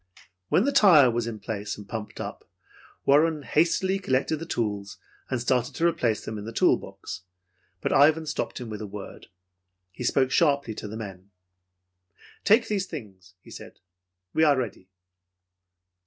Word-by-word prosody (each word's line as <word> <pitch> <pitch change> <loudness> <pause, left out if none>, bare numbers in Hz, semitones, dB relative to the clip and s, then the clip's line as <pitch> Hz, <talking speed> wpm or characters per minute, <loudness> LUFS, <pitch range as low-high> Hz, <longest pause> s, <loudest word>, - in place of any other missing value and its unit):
When 185 - +4
the 280 - +1
tire 170 - +7
was 115 0 -1
in 115 -2 -4
place 105 -2 -4
and 105 -1 -11
pumped 110 0 -6
up, - - -6 0.6
Warren 150 +2 +3
hastily 185 +6 +1
collected 140 -2 0
the 165 +2 -7
tools 105 - -3 0.3
and 130 - -1
started 125 +1 0
to 165 - 0
replace 130 -10 +1
them 110 -1 -5
in 105 - -8
the 115 - -5
tool - - +4
box 85 - -8 0.6
but - - 0
Ivan 155 +3 +5
stopped 150 - -3
him 125 - -6
with 110 -1 -6
a 105 - -5
word. 100 0 -9 0.6
He 110 - -7
spoke 130 +1 +2
sharply 140 -7 +2
to 105 - -7
the 110 +2 -7
men. 100 -3 -8 1.1
"Take 225 +2 +4
these 200 -3 -1
things," 95 - -10
he - - -16
said. - - -11 0.5
"We 160 - +3
are 145 -3 +5
ready!" 105 -7 -4
125 Hz, 165 wpm, -26 LUFS, 105-160 Hz, 1.1 s, tire